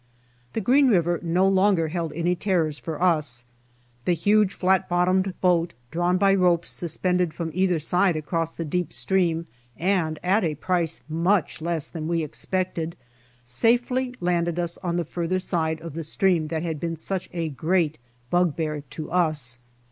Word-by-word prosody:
The 225 - -1
Green 265 +7 +4
river 175 -6 +2
no 180 +3 +2
longer 190 -4 +3
held 170 -1 -3
any 170 +3 0
terrors 170 -6 0
for 160 -3 -5
us. 150 -9 +1 0.6
The 180 - +3
huge 205 +4 +3
fiat 190 -1 +1
bottomed 185 +1 +1
boat, 175 -5 +2 0.2
drawn 175 +2 +1
by 195 0 +4
ropes 180 -3 +2
suspended 180 0 -1
from 165 -2 -3
either 185 0 +2
side 180 +3 +2
across 165 +1 -1
the 165 - -5
deep 180 +3 -2
stream 170 -4 0 0.3
and 170 -4 0
at 190 +4 +2
a 155 -3 0
price 170 +1 -1
much 170 +2 0
less 165 -2 -1
than 160 -2 -5
we 165 -1 0
expected, 170 +1 -2 0.5
safely 245 - +1
landed 175 -1 0
us 170 -1 -2
on 175 -2 -2
the 175 -1 -1
farther 175 +3 -2
side 160 -4 -1
of 165 -2 -7
the 165 +1 -4
stream 165 0 +1
that 160 +1 -3
had 160 -3 -3
been 165 +1 -2
such 185 +3 -3
a 165 -2 -2
great 160 +1 0 0.3
bug 175 -3 +2
bear 155 -2 -2
to 150 +2 -8
us. 155 -9 +1
170 Hz, 165 wpm, -25 LUFS, 160-185 Hz, 0.6 s, Green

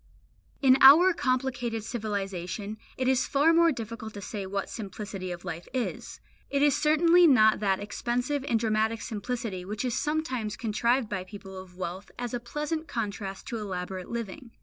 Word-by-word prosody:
In 265 0 +6
our 330 +8 +9
complicated 250 -5 -1
civilisation 205 -2 -4 0.2
it 255 - 0
is 260 -1 +2
far 295 +4 +4
more 335 0 +5
difficult 225 -3 -6
to - - -6
say 195 0 -5
what 200 +1 -3
simplicity 195 -2 -6
of 175 0 -7
life 170 -1 -6
is. 250 - -3 0.3
It 280 0 +1
is 290 -2 +4
certainly 335 +3 +5
not 220 -7 +5
that 195 -2 +1
expensive 245 +6 -2
and 230 -5 +1
dramatic 220 0 +1
simplicity 220 -4 -4
which 210 +6 -4
is 245 - -1
sometimes 260 -9 -2
contrived 235 +2 +1
by 190 -3 -3
people 195 0 -10
of 185 -1 -11
wealth 185 +2 -5
as 245 -1 -4
a 245 - -1
pleasant 300 +6 -4
contrast 205 -7 -4
to 230 -3 -3
elaborate 185 -2 -5
living. 235 +1 -5
225 Hz, 165 wpm, -28 LUFS, 200-260 Hz, 0.3 s, our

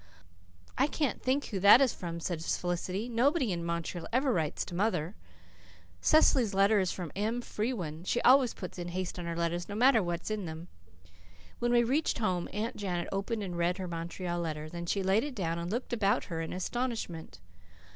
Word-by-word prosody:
"I 275 - +4
can't 300 -2 -1
think 270 +3 +1
who 200 - -3
that 200 +5 +9
is 270 -4 +3
from," 170 -1 -5
said 165 -1 -3
Felicity. 180 +5 -2
"Nobody 250 - +2
in 170 -1 -2
Montreal 170 0 -3
ever 260 +2 +2
writes 155 -6 -1
to - - -9
mother. 185 -3 0 0.9
Cecily's 255 -9 +4
letter 200 +2 +4
is 185 -2 +1
from 175 -5 -5
Em 220 +5 -1
Frewen. 210 -10 -3
She 235 - 0
always 255 -1 +5
puts 185 -1 -7
'In 175 - -4
Haste' 180 +1 -4
on 175 - -5
her 170 0 -3
letters, 170 +2 -2
no 205 - -4
matter 245 0 +5
what 175 -2 -3
is - - -4
in 210 -3 -2
them." 160 +2 -7 0.9
When 240 0 +1
we 240 0 +5
reached 275 +7 +1
home, 185 -6 -1
Aunt 215 +3 -3
Janet 180 -4 -2
opened 205 +3 -2
and 180 -3 -4
read 170 +1 +1
her 185 -1 -4
Montreal 175 +1 -4
letter. 155 -2 -3
Then 170 +1 -6
she 195 +2 0
laid 195 +4 +3
it 290 -3 -5
down 170 -4 -2
and 170 +1 -4
looked 240 +4 -3
about 205 -4 +2
her 165 -3 -4
in 160 - -4
astonishment. 185 - -4
190 Hz, 195 wpm, -31 LUFS, 170-235 Hz, 0.9 s, that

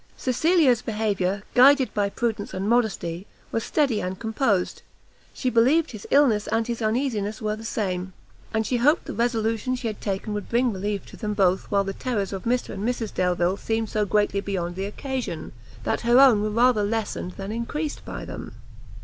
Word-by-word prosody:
Cecilia's 265 -1 +3
behaviour, 205 -4 -1
guided 265 -2 +6
by 205 -1 +1
prudence 220 -2 -3
and 190 +2 -2
modesty, 205 -6 0 0.2
was 225 - -1
steady 270 -8 +1
and 185 +1 -3
composed; 220 -4 0 0.5
she 260 - -4
believed 275 +8 +3
his 215 -4 -9
illness 245 -8 +4
and 225 0 +1
his 235 0 -4
uneasiness 220 -2 -1
were 215 -2 -1
the 220 - -10
same, 185 -5 -2 0.4
and 220 0 0
she 250 - 0
hoped 290 +7 +3
the - - -5
resolution 230 +1 0
she 250 -1 -7
had 215 -2 -3
taken 200 +1 -3
would 205 -1 -5
bring 240 0 +2
relief 200 +1 -3
to - - -13
them 210 -2 -3
both 190 -2 +2
while 200 -1 +2
the 195 0 -4
terrors 205 -4 -2
of 190 - -6
Mr 245 +1 0
and 195 - -5
Mrs 230 -2 -2
Delvile 180 +1 +1
seemed 225 0 -2
so 215 - +1
greatly 205 -1 +1
beyond 175 -3 -3
the 190 +1 -3
occasion, 235 - -4 0.3
that - - -1
her 240 +2 +5
own 255 -6 +7
were 215 - 0
rather 235 +1 +3
lessened 205 -4 -2
than 195 +1 -6
increased 290 +7 -3
by - - -6
them. - - -8
220 Hz, 185 wpm, -25 LUFS, 200-245 Hz, 0.5 s, own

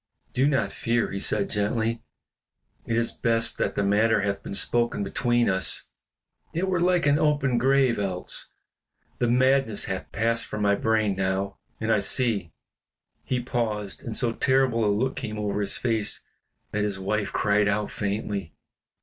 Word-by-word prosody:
"Do 130 +3 +3
not 140 -2 +1
fear," 115 0 0
he 100 - -3
said, 100 0 0
gently, 110 +2 -1 0.9
"it 115 - 0
is 115 0 +1
best 115 -1 0
that - - 0
the 100 - +1
matter 105 +3 +3
hath 100 0 -1
been 100 - -5
spoken 120 -1 +1
between 120 +4 +1
us; 95 0 +1 0.7
it 175 +4 -1
were 185 -2 +1
like 175 -2 +3
an 145 +1 +4
open 145 -5 +2
grave 130 -2 +3
else. 95 -3 -2 0.7
The 120 - +2
madness 130 -2 +2
hath 95 -1 -5
passed 115 0 0
from 105 -1 -3
my 100 0 +4
brain 110 -1 +1
now, 95 +1 -2 0.2
and 110 0 0
I 110 - +4
see 100 -4 0 0.4
" - - -65 0.3
He 125 -1 -1
paused, 110 -5 -2
and 115 - -4
so 120 -2 +4
terrible 130 -3 +2
a - - +3
look 125 +6 0
came 110 0 -4
over 105 -1 -1
his 100 -1 0
face 115 -4 -1 0.5
that 105 0 0
his 105 -2 -1
wife 105 +2 -2
cried 105 0 +2
out 105 +1 0
faintly. 100 -4 -3
110 Hz, 165 wpm, -26 LUFS, 100-120 Hz, 0.9 s, an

